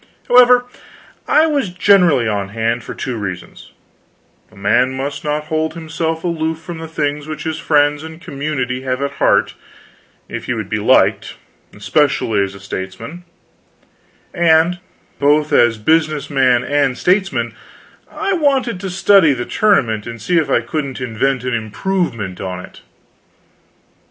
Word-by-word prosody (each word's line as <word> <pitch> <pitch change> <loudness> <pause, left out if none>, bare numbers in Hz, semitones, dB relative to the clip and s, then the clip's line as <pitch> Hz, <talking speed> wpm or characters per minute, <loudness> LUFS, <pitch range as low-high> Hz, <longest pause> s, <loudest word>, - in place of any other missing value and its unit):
However, 245 0 +6 0.6
I 310 - +4
was 285 - 0
generally 180 - +3
on 100 -2 -2
hand 115 +3 -2
for - - -8
two 125 -3 -4
reasons: 95 -4 -7 0.8
a - - -20
man 115 +6 +1
must 140 +2 -4
not 150 0 -1
hold 155 +1 -2
himself 160 0 -3
aloof 160 -2 -2
from 170 0 -8
the 160 - -7
things 150 -2 -3
which 155 -1 -6
his 160 -1 -3
friends 145 -1 +2
and 160 0 -9
his 160 - -17
community 135 -3 -3
have 130 -1 -2
at 140 - -2
heart - - +3 0.7
if - - -6
he - - -2
would - - -5
be - - -1
liked - - +2 0.4
especially 110 -2 +1
as 100 0 -3
a - - -11
statesman; 100 - -7 1.1
and 170 0 +3 0.4
both 150 +1 +2
as 120 -2 +4
business 155 +5 0
man 130 -3 +3
and 140 -3 0
statesman 190 +1 0 0.6
I 395 -1 -2
wanted 270 - +1
to 190 0 -5
study 185 -4 +4
the 120 -2 -4
tournament 120 - +1
and 115 -1 -7
see 175 +8 +1
if 150 -3 -2
I 120 - +2
couldn't 140 +2 -4
invent 125 +1 -1
an 125 -1 -2
improvement 115 - -3
on 90 -1 -4
it. - - -17
150 Hz, 150 wpm, -17 LUFS, 120-170 Hz, 1.1 s, However